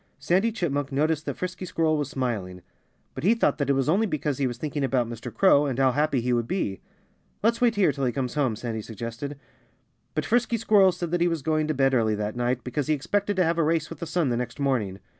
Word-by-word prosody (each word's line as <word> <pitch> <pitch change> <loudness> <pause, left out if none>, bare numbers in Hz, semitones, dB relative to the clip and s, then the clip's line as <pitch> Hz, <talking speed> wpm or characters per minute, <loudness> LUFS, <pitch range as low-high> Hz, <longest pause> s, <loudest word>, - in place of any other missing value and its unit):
Sandy 180 +11 +1
Chipmunk 145 - -2
noticed 155 +3 0
that - - -2
Frisky 185 +1 -5
Squirrel 165 -3 +1
was 145 -2 -2
smiling. 105 -10 -3 0.5
But - - -7
he 215 +6 +4
thought 230 - +1
that 140 -1 0
it - - +5
was 135 0 0
only 200 +8 +3
because 150 -5 -2
he 135 - +2
was 120 -1 -5
thinking 145 +1 -3
about 130 -3 +1
Mr. 115 +1 -7
Crow, 145 - +4
and 130 -3 -2
how 135 -1 +4
happy 145 -1 +1
he 125 +1 0
would 120 -1 0
be. 110 - -2 0.6
"Let's 230 +2 +2
wait 240 -2 +3
here 190 -6 +3
till 140 -1 -2
he 125 - +1
comes 130 -1 -3
home," 135 -7 +1
Sandy 115 0 -4
suggested. 115 +6 -6 0.8
But - - -1
Frisky 240 0 +1
Squirrel 205 -4 +5
said 175 -1 -5
that 175 -1 0
he 175 - +4
was 165 -4 -2
going 155 +1 +1
to 155 - -1
bed 135 0 +2
early 110 -4 +2
that 105 +1 -3
night, 120 0 -1
because 140 +3 -3
he 155 - +3
expected 200 +7 -1
to 185 - +3
have 165 +1 0
a - - +4
race 160 0 0
with 165 - -8
the 170 - -5
sun 165 -3 0
the 120 - 0
next 125 +2 -5
morning. 120 -9 0
145 Hz, 250 wpm, -26 LUFS, 125-170 Hz, 0.8 s, it